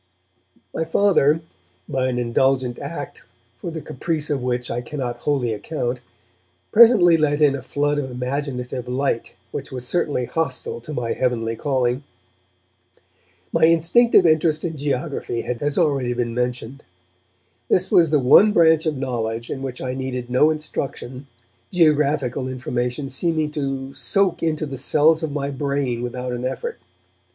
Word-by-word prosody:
My - - -1
Father, 165 -3 +3 0.5
by 130 -1 0
an 125 -1 -1
indulgent 125 +1 +1
act - - -7 0.4
for 170 - -5
the 160 -1 -6
caprice 155 +2 -3
of 140 -3 0
which 125 -1 -2
I 120 - -2
cannot 125 -2 -4
wholly 130 -4 0
account, 125 +1 -3 0.7
presently 210 -7 +7
let 150 -1 +1
in 145 -2 +4
a 140 - -4
flood 145 +3 -1
of 130 -2 -3
imaginative 125 -1 -4
light 125 -1 -1 0.2
which - - -6
was 125 -1 -6
certainly 145 -5 0
hostile 130 -6 -3
to 135 - -9
my 120 -4 -2
heavenly 115 -3 -1
calling. 130 0 0 1.5
My - - +5
instinctive 175 +6 +4
interest 155 -1 +2
in 165 -2 -3
geography 140 -3 -2
has 140 +5 -3
already 130 -5 +1
been 120 -1 -2
mentioned. 125 +2 -3 0.9
This 185 0 +2
was 165 -3 +5
the 150 - +3
one 145 +11 +6
branch 160 -2 +4
of 150 -3 -1
knowledge 115 -3 -3
in 135 - -4
which 130 -2 -5
I 125 -1 -2
needed 130 -2 -4
no 130 +5 +4
instruction, 140 -3 -5 0.4
geographical 150 -6 +2
information 125 +1 -3
seeming 155 +1 -1
to 135 -2 -4
soak 195 -1 +1
into 155 -1 0
the 135 -3 -6
cells 155 +4 +3
of 160 -2 -2
my 140 -1 -2
brain 140 -3 -2
without 125 +1 -4
an 125 0 -4
effort. 455 - -4
135 Hz, 145 wpm, -22 LUFS, 125-155 Hz, 1.5 s, presently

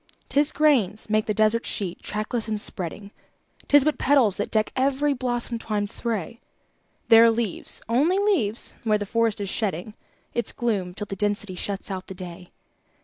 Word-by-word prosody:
'Tis 290 +1 +3
grains 220 -10 +2
make 215 0 +2
the - - +1
desert 215 +2 +2
sheet, 185 -4 -4
trackless 215 +2 -3
and 215 -1 -1
spreading; 200 +1 -4 0.6
'Tis 290 -1 +6
but 305 +1 0
petals 255 -8 +3
that 205 - -2
deck 215 -1 +1
every 275 +2 +2
blossom 245 -2 -2
twinned 205 -2 -2
spray; 230 -2 -3 0.7
There 225 0 +9
are - - +7
leaves 225 -4 -2
only 285 - +3
leaves 350 - 0
where 215 -2 +3
the 205 - -4
forest 230 0 +1
is 200 -2 -3
shedding 200 -1 -2 0.4
Its 235 - 0
gloom 195 -7 -1
till 210 - -4
the 195 - -6
density 205 0 -1
shuts 195 +2 -4
out 185 -1 -5
the 190 - -8
day. 180 -1 -9
215 Hz, 170 wpm, -25 LUFS, 200-240 Hz, 0.7 s, There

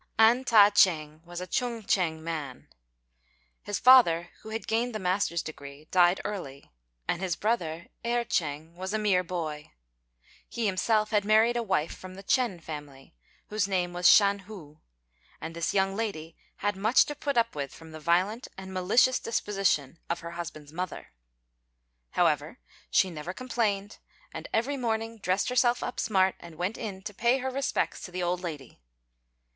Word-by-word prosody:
An 230 +4 +5
Ta 210 -4 +7
ch'êng 155 -5 +2
was 175 0 -7
a - - -4
Chung 235 +3 -2
ch'ing 165 -5 0
man. 155 -6 -5 0.9
His 205 - -3
father, 175 -10 +6
who 220 - -10
had 225 +1 -4
gained 230 +1 -1
the - - -2
master's 180 -2 0
degree, 145 -1 -10
died 180 0 +4
early; 140 -10 -6 0.4
and 170 - -1
his 185 -4 -1
brother 170 -7 -1 0.2
Erh 240 0 +1
ch'êng 160 -4 -2
was 190 +4 -4
a - - +2
mere 200 -4 +2
boy. 160 -4 -5 0.8
He 235 - -3
himself 215 +2 +1
had 210 -2 +2
married 220 +3 +4
a 240 - +1
wife 190 -8 -1
from 185 0 -10
the 195 - -10
Ch'ên 235 -4 +1
family, 145 -3 -9 0.4
whose 210 -2 0
name 180 -2 -1
was 175 -1 +4
Shan 200 -1 +6
hu; 180 -7 -12 0.6
and 165 +1 -7
this 170 0 -1
young 195 0 +1
lady 170 -7 -4 0.2
had 205 0 -1
much 215 +6 +4
to 295 - -4
put 285 -2 -3
up 230 0 +2
with 140 -2 -4
from 160 -1 -13
the 155 - -9
violent 185 +9 +1
and 190 0 -8
malicious 215 +8 +3
disposition 195 - -1
of 170 - -2
her 170 0 -7
husband's 160 -3 -8
mother. 180 - -5 1.1
However, - - +1 0.3
she 190 - +3
never 165 +3 -6
complained; 210 -4 -2 0.3
and - - -7
every 270 +6 0
morning 225 -2 -2
dressed 190 +2 0
herself 245 -1 +2
up 245 - -4
smart, 190 -3 +2
and 170 -2 -12
went 180 +7 -3
in 195 -4 -6
to 210 - -6
pay 240 +5 +2
her 265 0 -3
respects 275 +2 -1
to 180 - -8
the 180 0 -3
old 175 +1 0
lady. 150 -8 -7
190 Hz, 170 wpm, -28 LUFS, 170-220 Hz, 1.1 s, Ta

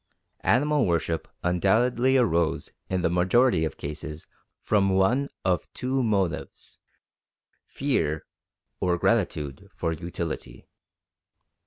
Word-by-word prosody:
Animal 145 +1 +2
worship 85 -1 0 0.2
undoubtedly 120 +9 +3
arose 85 - +1 0.2
in 95 -1 -1
the 85 - +3
majority 90 +1 +3
of 75 - -5
cases 75 +1 -6 0.3
from 100 -2 +2
one 95 +9 +2 0.2
of 90 -2 0
two 130 +1 -1
motives: 100 -7 -2 0.9
fear 100 - -1 0.5
or 90 -1 +1
gratitude 85 -10 0
for 80 - -1
utility. 85 0 -6
90 Hz, 100 wpm, -26 LUFS, 80-120 Hz, 0.9 s, undoubtedly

